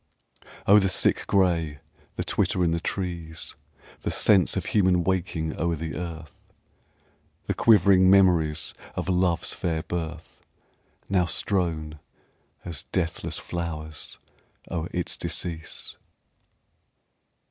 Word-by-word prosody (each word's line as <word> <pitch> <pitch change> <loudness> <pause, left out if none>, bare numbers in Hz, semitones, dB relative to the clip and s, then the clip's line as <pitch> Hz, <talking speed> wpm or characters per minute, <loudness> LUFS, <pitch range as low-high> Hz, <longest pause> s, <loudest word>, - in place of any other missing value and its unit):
Oh, 105 +2 +7
the 95 -1 +1
sick - - +2
gray, 85 -6 +2 0.4
the - - -2
twitter 90 - +1
in 85 - +2
the 85 - 0
trees, 85 -3 -4 0.5
The - - -2
sense 95 -5 +4
of - - -2
human 90 -4 +3
waking 85 -3 -1
o'er 85 0 +1
the 80 +1 -5
earth! 80 -3 -8 0.9
The - - 0
quivering 95 -4 +5
memories 85 -5 +4 0.2
of - - -3
love's 90 -2 +1
fair 80 -3 -2
birth 85 -1 -6 0.7
Now 90 -3 +2
strown 80 -4 -1 0.7
as 85 -5 -4
deathless 85 -2 -2
flowers 80 -3 -5 0.5
o'er 85 -1 -2
its 90 -2 -2
decease! 80 -3 -3
85 Hz, 110 wpm, -26 LUFS, 80-95 Hz, 0.9 s, Oh